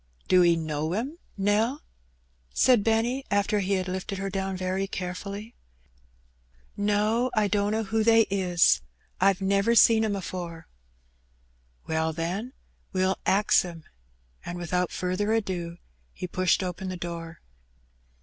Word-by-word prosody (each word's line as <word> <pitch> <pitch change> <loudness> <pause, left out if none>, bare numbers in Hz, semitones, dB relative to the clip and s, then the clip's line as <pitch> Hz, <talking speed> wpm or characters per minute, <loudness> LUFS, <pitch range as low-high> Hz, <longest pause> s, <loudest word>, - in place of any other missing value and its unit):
''Do 180 -1 +5
'e 170 -1 +5
know 155 0 -2
'em, 270 - -3 0.2
Nell?'' 215 +8 +1 0.7
said 240 - +4
Benny, 230 +4 +1
after 205 +1 +1
he 200 0 0
had 185 -1 0
lifted 190 +2 -4
her 195 +1 -3
down 195 -1 -2
very 185 +1 -1
carefiilly. 200 +4 -6 1.2
''No, 210 +4 +1
I 215 -1 +3
dunno 210 +2 0
who 220 +2 0
they 225 0 +6
is; 180 - +3 0.4
I've 195 +1 +3
never 200 +4 +2
seen 225 -1 +6
'em 210 -2 0
afore." 175 -3 -6 1.2
"Well, 160 0 -1
then, 180 +10 -3 0.4
we'll 185 0 0
ax 205 +2 +4
'em." 170 -3 -8 0.6
And 175 - -6
without 180 +1 -1
farther 185 +4 -1
ado 180 -6 -2 0.4
he - - -6
pushed 185 +1 +1
open 185 +1 -4
the 185 - -4
door. 170 -1 -6
195 Hz, 130 wpm, -27 LUFS, 180-210 Hz, 1.2 s, they